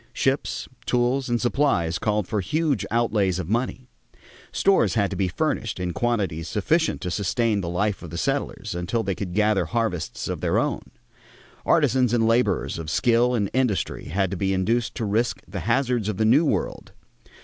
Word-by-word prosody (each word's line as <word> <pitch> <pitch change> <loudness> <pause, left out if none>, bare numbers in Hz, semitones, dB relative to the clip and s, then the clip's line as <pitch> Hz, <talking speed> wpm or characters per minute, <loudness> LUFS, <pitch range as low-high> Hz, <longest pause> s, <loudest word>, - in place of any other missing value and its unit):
Ships, 135 0 -1 0.2
tools, 125 +2 +1
and 120 0 +1
supplies 115 - +1
called 105 -3 0
for 105 -2 -1
huge 150 - 0
outlays 105 -6 +1
of 90 -4 -4
money. 125 +2 -1 0.6
Stores 115 - +3
had 100 -4 +1
to - - -3
be 95 - 0
furnished 115 - -2
in 90 -1 -2
quantities 95 -8 -1
sufficient 160 - 0
to 90 - -3
sustain 105 +3 0
the 85 - -4
life 100 +3 -1
of 85 - -8
the 85 - -6
settlers - - -2
until 90 +7 -1
they 95 - -1
could 90 -1 -5
gather 105 -1 +2
harvests 115 -8 -2
of - - -4
their - - +1
own. - - 0 0.9
Artisans 125 -3 +3
and 115 -2 +3
laborers 115 -6 +1
of 80 -2 -5
skill 120 +7 +3
and 100 -4 -1
industry 125 -7 0
had 95 +3 -1
to 100 - -3
be 95 +1 0
induced 115 +5 0
to 115 - -2
risk 110 +4 0
the 95 +1 -5
hazards 125 -3 +1
of 105 - -3
the 110 - +2
new 135 +9 +5
world. - - -2
110 Hz, 180 wpm, -24 LUFS, 95-120 Hz, 0.9 s, new